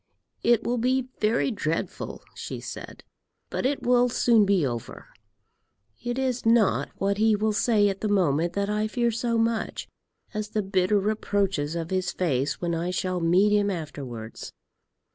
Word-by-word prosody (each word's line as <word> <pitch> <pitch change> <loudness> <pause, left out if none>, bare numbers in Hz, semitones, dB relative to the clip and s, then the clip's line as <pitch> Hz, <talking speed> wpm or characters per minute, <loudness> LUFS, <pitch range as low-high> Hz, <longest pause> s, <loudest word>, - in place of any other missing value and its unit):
"It 235 -2 +3
will 240 0 0
be 255 +2 +1
very 225 +4 +2
dreadful," 165 -7 -3
she - - -6
said, - - -8 0.5
"but - - 0
it 280 +1 -2
will 245 0 +4
soon 230 -3 +4
be 190 -6 +3
over. 120 -3 -5 0.9
It 240 +1 -3
is 255 -2 -1
not 225 -2 +3
what 200 +1 -1
he 220 0 +4
will 215 +1 0
say 210 -1 +3
at 195 -1 -2
the 215 - 0
moment 175 -4 +2
that 200 +1 -1
I 210 +1 0
fear 235 +2 0
so 230 +1 -1
much, 225 -1 -1 0.5
as 215 -1 -3
the 215 -1 -1
bitter 190 +1 +2
reproaches 195 -6 0
of 165 0 -4
his 185 -1 0
face 140 -6 -1
when 170 -1 -1
I 165 +2 -1
shall 185 0 -1
meet 180 +5 +3
him 205 -1 +2
afterwards." 135 - -6
205 Hz, 160 wpm, -26 LUFS, 175-230 Hz, 0.9 s, will